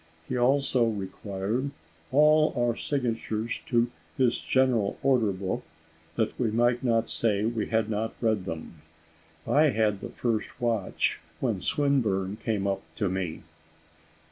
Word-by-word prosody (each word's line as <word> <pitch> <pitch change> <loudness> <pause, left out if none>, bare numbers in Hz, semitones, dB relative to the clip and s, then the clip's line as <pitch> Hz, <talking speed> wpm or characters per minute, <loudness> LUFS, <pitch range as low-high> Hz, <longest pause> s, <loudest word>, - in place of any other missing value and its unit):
He - - -2
also 130 0 +3
required 100 +4 -3 0.4
all 155 +2 +5
our 120 -1 +2
signatures 115 -5 -2
to 120 -1 +2 0.3
his 125 -3 +3
general 125 -6 +2
order 125 -6 +3
book, 95 0 -3 0.5
that - - -1
we 120 -3 +2
might 120 +3 +2
not 115 -2 +2
say 105 -2 +1
we 115 -1 -1
had 110 -1 +1
not 110 +1 -2
read 110 -5 +1
them. 80 -2 -7 0.6
I 150 +2 +4
had 110 -7 +1
the - - -5
first 115 -1 -2
watch, 115 -6 0 0.2
when 115 -8 -1
Swinburne 105 - +1
came 110 -3 -1
up 100 -1 0
to 100 - 0
me. 90 -3 -3
115 Hz, 135 wpm, -27 LUFS, 100-125 Hz, 0.6 s, all